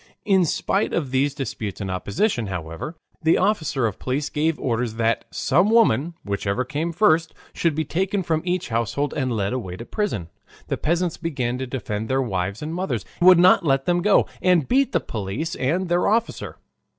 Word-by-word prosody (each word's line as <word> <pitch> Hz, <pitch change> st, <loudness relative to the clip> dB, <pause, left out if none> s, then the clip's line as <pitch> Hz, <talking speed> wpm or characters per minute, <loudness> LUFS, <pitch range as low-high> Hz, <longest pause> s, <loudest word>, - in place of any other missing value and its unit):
In 190 Hz, -3 st, +4 dB
spite 195 Hz, +5 st, 0 dB
of 145 Hz, -6 st, -1 dB
these 135 Hz, +2 st, +1 dB
disputes 110 Hz, -6 st, -4 dB
and 95 Hz, -2 st, -3 dB
opposition, 105 Hz, -, -1 dB
however, 85 Hz, -, -5 dB, 0.3 s
the 160 Hz, 0 st, +4 dB
officer 160 Hz, -, +1 dB
of 110 Hz, -, -2 dB
police 140 Hz, +3 st, -2 dB
gave 155 Hz, +1 st, 0 dB
orders 120 Hz, -2 st, -1 dB
that 115 Hz, 0 st, 0 dB
some 175 Hz, +9 st, +2 dB
woman, 175 Hz, -, +3 dB
whichever 100 Hz, +4 st, -1 dB
came 150 Hz, +5 st, -2 dB
first, 165 Hz, -3 st, +2 dB, 0.2 s
should 165 Hz, -3 st, 0 dB
be 160 Hz, 0 st, -1 dB
taken 190 Hz, +5 st, -1 dB
from 160 Hz, -2 st, 0 dB
each 180 Hz, 0 st, -2 dB
household 115 Hz, +5 st, -1 dB
and 130 Hz, -3 st, -1 dB
led 100 Hz, -2 st, -1 dB
away 95 Hz, -9 st, -4 dB
to 115 Hz, -, -8 dB
prison. 120 Hz, -, -2 dB, 0.4 s
The -, -, -1 dB
peasants 170 Hz, +1 st, 0 dB
began 130 Hz, -7 st, -2 dB
to 130 Hz, -, -3 dB
defend 110 Hz, -4 st, -4 dB
their 130 Hz, 0 st, +2 dB
wives 100 Hz, -2 st, -2 dB
and 155 Hz, +2 st, -4 dB
mothers, 185 Hz, +2 st, -2 dB, 0.2 s
would 180 Hz, 0 st, +8 dB
not 180 Hz, +2 st, +6 dB
let 135 Hz, -3 st, +1 dB
them 175 Hz, 0 st, +2 dB
go, 205 Hz, +2 st, +4 dB, 0.2 s
and 180 Hz, -6 st, +3 dB
beat 270 Hz, +1 st, +2 dB
the -, -, +1 dB
police 110 Hz, +9 st, -4 dB
and 170 Hz, +8 st, 0 dB
their 175 Hz, +1 st, +2 dB
officer. 230 Hz, +2 st, -1 dB
145 Hz, 185 wpm, -23 LUFS, 115-175 Hz, 0.4 s, would